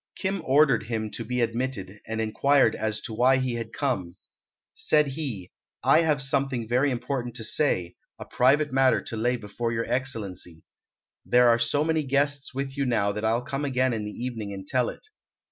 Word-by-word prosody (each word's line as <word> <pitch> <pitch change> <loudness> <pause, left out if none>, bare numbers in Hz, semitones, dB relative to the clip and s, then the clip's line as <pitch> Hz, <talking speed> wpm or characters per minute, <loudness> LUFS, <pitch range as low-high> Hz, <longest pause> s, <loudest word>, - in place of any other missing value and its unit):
Kim 195 -1 -2
ordered 135 -6 +3
him 110 -2 -3
to 115 - -5
be 125 +2 -2
admitted, 115 -4 -3
and 110 0 -3
inquired 115 +3 +3
as 110 -1 -2
to 110 - -6
why 125 +4 +4
he 130 -2 -1
had 115 -1 -5
come. 95 -12 -2 0.6
Said 155 - +2
he, 130 - -5 0.3
"I 160 - +5
have 150 -4 +2
something 135 -4 0
very 125 +5 +2
important 120 -1 -3
to 115 - -4
say, 110 - 0 0.2
a - - -8
private 145 +3 +2
matter 135 -1 +3
to - - -6
lay 120 +3 0
before 115 +2 -4
your 115 0 -1
Excellency. 100 -10 -3 0.6
There 125 0 +4
are 115 0 +4
so 115 +6 +1
many 160 0 +1
guests 140 0 0
with 135 0 -4
you 140 -1 -1
now 100 -4 +1
that 105 +1 -5
I'll 115 +2 +1
come 135 +3 -4
again 130 -2 +1
in 110 -2 -3
the 105 - -4 0.2
evening 110 -5 -5
and 95 -1 -7
tell 125 +3 +1
it." - - -10
125 Hz, 190 wpm, -26 LUFS, 110-140 Hz, 0.6 s, I